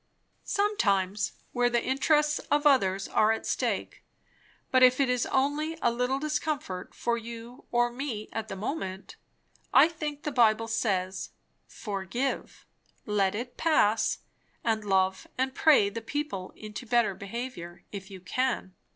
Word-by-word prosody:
"Sometimes, 210 Hz, -, +1 dB, 0.2 s
where 245 Hz, -1 st, +2 dB
the 240 Hz, -1 st, +1 dB
interests 295 Hz, +3 st, +2 dB
of 295 Hz, 0 st, +2 dB
others 195 Hz, -9 st, +3 dB
are 215 Hz, +1 st, +3 dB
at 225 Hz, -, -2 dB
stake. -, -, -2 dB, 0.7 s
But 255 Hz, -, +4 dB
if 255 Hz, +1 st, +6 dB
it 270 Hz, -2 st, +3 dB
is 250 Hz, -1 st, 0 dB
only 295 Hz, +4 st, 0 dB
a 240 Hz, -, +2 dB
little 250 Hz, +3 st, 0 dB
discomfort 295 Hz, -10 st, -3 dB
for 235 Hz, 0 st, 0 dB
you 235 Hz, +2 st, -9 dB
or 240 Hz, 0 st, +2 dB
me 240 Hz, -4 st, -4 dB
at 225 Hz, -1 st, -3 dB
the -, -, -5 dB
moment, 195 Hz, -3 st, -4 dB, 0.6 s
I -, -, +7 dB
think 305 Hz, -3 st, -5 dB
the 300 Hz, -, -2 dB
Bible 225 Hz, -3 st, +3 dB
says, 190 Hz, -4 st, -1 dB, 0.4 s
Forgive, 210 Hz, +6 st, -4 dB, 0.4 s
let 205 Hz, -2 st, +1 dB
it 245 Hz, +3 st, -5 dB
pass, 225 Hz, -9 st, +3 dB, 0.5 s
and 220 Hz, -2 st, +1 dB
love 190 Hz, -1 st, +1 dB
and 260 Hz, +1 st, 0 dB
pray 285 Hz, -10 st, +5 dB
the 215 Hz, +3 st, -5 dB
people 230 Hz, -6 st, -4 dB
into 215 Hz, +3 st, -8 dB
better 235 Hz, -3 st, +3 dB
behaviour, 200 Hz, -3 st, -7 dB
if 195 Hz, -1 st, -7 dB
you 190 Hz, -2 st, -10 dB
can." 235 Hz, 0 st, -1 dB
235 Hz, 140 wpm, -28 LUFS, 200-270 Hz, 0.7 s, I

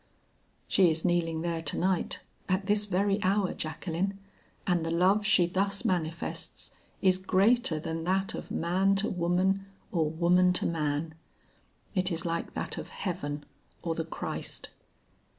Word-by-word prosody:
She 185 Hz, -3 st, +5 dB
is 160 Hz, +2 st, -1 dB
kneeling 165 Hz, -2 st, +1 dB
there 170 Hz, -1 st, -1 dB
to -, -, 0 dB
night, 185 Hz, -1 st, 0 dB, 0.3 s
at 185 Hz, +1 st, +1 dB
this 210 Hz, +1 st, +2 dB
very 200 Hz, +2 st, +1 dB
hour, 195 Hz, 0 st, +2 dB
Jacqueline, 170 Hz, +5 st, -3 dB, 0.5 s
and 175 Hz, -3 st, +2 dB
the 165 Hz, -, -1 dB
love 185 Hz, +5 st, +3 dB
she 215 Hz, -5 st, +5 dB
thus 195 Hz, +3 st, 0 dB
manifests 165 Hz, -2 st, -2 dB, 0.3 s
is 185 Hz, -1 st, +4 dB
greater 190 Hz, -1 st, +3 dB
than 160 Hz, +1 st, -3 dB
that 190 Hz, +2 st, +1 dB
of -, -, -6 dB
man 185 Hz, +4 st, +2 dB
to 195 Hz, +2 st, +1 dB
woman 185 Hz, +2 st, +1 dB, 0.2 s
or 160 Hz, -4 st, +1 dB
woman 175 Hz, +3 st, +4 dB
to -, -, -1 dB
man. 155 Hz, -1 st, -1 dB, 0.8 s
It 185 Hz, -2 st, +1 dB
is 165 Hz, 0 st, -2 dB
like 170 Hz, 0 st, -2 dB
that -, -, -2 dB
of -, -, -7 dB
heaven 145 Hz, -6 st, -4 dB, 0.4 s
or 165 Hz, -1 st, 0 dB
the 165 Hz, -, -2 dB
Christ." 160 Hz, -, -5 dB
180 Hz, 150 wpm, -29 LUFS, 165-195 Hz, 0.8 s, She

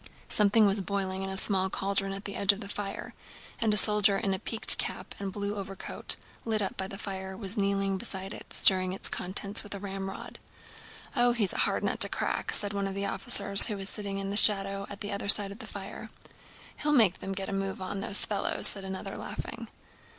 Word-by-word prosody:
Something 210 Hz, +1 st, +3 dB
was 200 Hz, 0 st, +2 dB
boiling 190 Hz, -1 st, -4 dB
in 195 Hz, -, -5 dB
a 190 Hz, -, -2 dB
small 190 Hz, -1 st, +3 dB
cauldron 195 Hz, 0 st, -3 dB
at 195 Hz, +1 st, -8 dB
the 200 Hz, -, -6 dB
edge 200 Hz, 0 st, +3 dB
of 200 Hz, -, -7 dB
the 205 Hz, -, -8 dB
fire 200 Hz, -1 st, -7 dB, 0.5 s
and 225 Hz, -2 st, 0 dB
a 210 Hz, -, +1 dB
soldier 210 Hz, -1 st, +3 dB
in 195 Hz, 0 st, -2 dB
a 190 Hz, -, -4 dB
peaked 225 Hz, +3 st, +3 dB
cap -, -, -6 dB
and 200 Hz, -1 st, -5 dB
blue 200 Hz, +1 st, -4 dB
overcoat, 195 Hz, -1 st, -4 dB, 0.3 s
lit 220 Hz, -2 st, -2 dB
up 195 Hz, -, -3 dB
by 190 Hz, -, -4 dB
the 195 Hz, -, -9 dB
fire, 190 Hz, -2 st, -7 dB
was 200 Hz, -1 st, -2 dB
kneeling 195 Hz, -2 st, -1 dB
beside 195 Hz, -3 st, -5 dB
it -, -, -12 dB
stirring 185 Hz, -1 st, +4 dB
its 195 Hz, -, 0 dB
contents 200 Hz, +3 st, 0 dB
with 205 Hz, -1 st, -8 dB
a -, -, -8 dB
ramrod. 195 Hz, -1 st, -8 dB, 0.8 s
"Oh, 245 Hz, -1 st, +2 dB
he's 215 Hz, -5 st, 0 dB
a -, -, -5 dB
hard -, -, -3 dB
nut -, -, -2 dB
to -, -, +5 dB
crack," -, -, -3 dB
said 205 Hz, 0 st, -1 dB
one 200 Hz, -1 st, -3 dB
of 195 Hz, -, -7 dB
the 200 Hz, 0 st, -3 dB
officers 200 Hz, -5 st, +6 dB
who 210 Hz, -, -5 dB
was 195 Hz, 0 st, -3 dB
sitting 200 Hz, -2 st, -5 dB
in 195 Hz, 0 st, -5 dB
the 205 Hz, -, +2 dB
shadow 195 Hz, -2 st, +7 dB
at 200 Hz, 0 st, -11 dB
the 205 Hz, -, -5 dB
other 200 Hz, 0 st, -5 dB
side 200 Hz, -1 st, +7 dB
of 200 Hz, -, -12 dB
the 220 Hz, -, -9 dB
fire. 200 Hz, +2 st, -9 dB, 0.7 s
"He'll 300 Hz, 0 st, -1 dB
make 215 Hz, -9 st, +3 dB
them 195 Hz, -, -6 dB
get 195 Hz, 0 st, -5 dB
a -, -, -6 dB
move 195 Hz, 0 st, -4 dB
on, 190 Hz, +1 st, -6 dB
those 200 Hz, 0 st, -1 dB
fellows!" 205 Hz, -, -3 dB
said 195 Hz, -, +2 dB
another, 190 Hz, 0 st, -7 dB
laughing. -, -, -8 dB
200 Hz, 225 wpm, -27 LUFS, 195-205 Hz, 0.8 s, shadow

